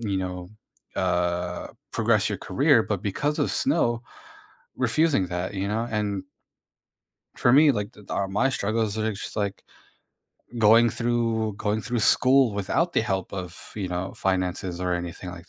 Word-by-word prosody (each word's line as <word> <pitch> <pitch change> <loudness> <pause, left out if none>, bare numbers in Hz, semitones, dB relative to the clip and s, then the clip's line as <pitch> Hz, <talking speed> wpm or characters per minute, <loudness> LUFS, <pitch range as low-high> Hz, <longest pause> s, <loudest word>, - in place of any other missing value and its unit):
you 100 -4 -2
know, 90 -1 -4 0.5
uh, 90 -1 -1 0.2
progress - - +2
your - - -3
career, - - +3
but - - -3
because 145 +10 -1
of 145 - +1
snow 120 -5 +1 0.7
refusing 130 - +2
that, 90 +2 -4
you 100 0 -2
know, 110 +3 -1
and 105 -3 -2 1.1
for 120 - +3
me, 145 +2 +7
like, 105 -4 -4
the 105 - -15
th - - -12
are 100 -1 -1
my 120 +8 +1
struggles 110 -3 -1
are 110 0 0
just 100 - -7
like 100 -2 -3 1.0
going 115 +2 +6
through 115 -2 0
going 105 +1 -1
through 120 -1 -2
school 130 +1 +5
without 135 - 0
the - - +2
help 95 -5 -2
of, 90 -3 -6
you 95 -3 -3
know, 90 +2 -3
finances 90 -1 -2
or 90 -1 0
anything 85 +1 -5
like 90 +1 -11
105 Hz, 160 wpm, -25 LUFS, 95-115 Hz, 1.1 s, me